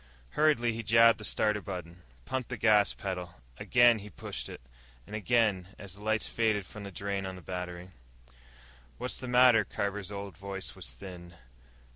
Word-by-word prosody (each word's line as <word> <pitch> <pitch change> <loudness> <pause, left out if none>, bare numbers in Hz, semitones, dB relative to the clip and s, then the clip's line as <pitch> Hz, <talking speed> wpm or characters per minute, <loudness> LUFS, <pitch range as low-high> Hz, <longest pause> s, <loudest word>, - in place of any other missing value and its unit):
Hurriedly, 140 -7 +3
he 115 - -4
jabbed 115 +1 +6
the - - -7
starter 105 0 +1
button, 90 -3 -7 0.2
pumped 130 -2 -3
the - - -4
gas 105 -2 +4
pedal. 90 -3 -5 0.2
Again 120 -2 +5
he 105 +1 -9
pushed 90 - -6
it, - - -8 0.5
and 105 - -7
again, 110 -4 +2
as 100 -3 -9
the 100 - -13
lights 110 0 +1
faded 110 -4 +1
from 105 - -10
the 100 - -7
drain 100 +1 -3
on 95 - -6
the 90 - -10
battery. 90 0 -6 1.1
"What's 125 +1 -2
the 130 - -5
matter?" 125 -2 +6
Carver's 100 -1 -3
old 100 -1 -6
voice 100 0 -6
was - - -5
thin. 85 +3 -10
100 Hz, 170 wpm, -30 LUFS, 95-115 Hz, 1.1 s, jabbed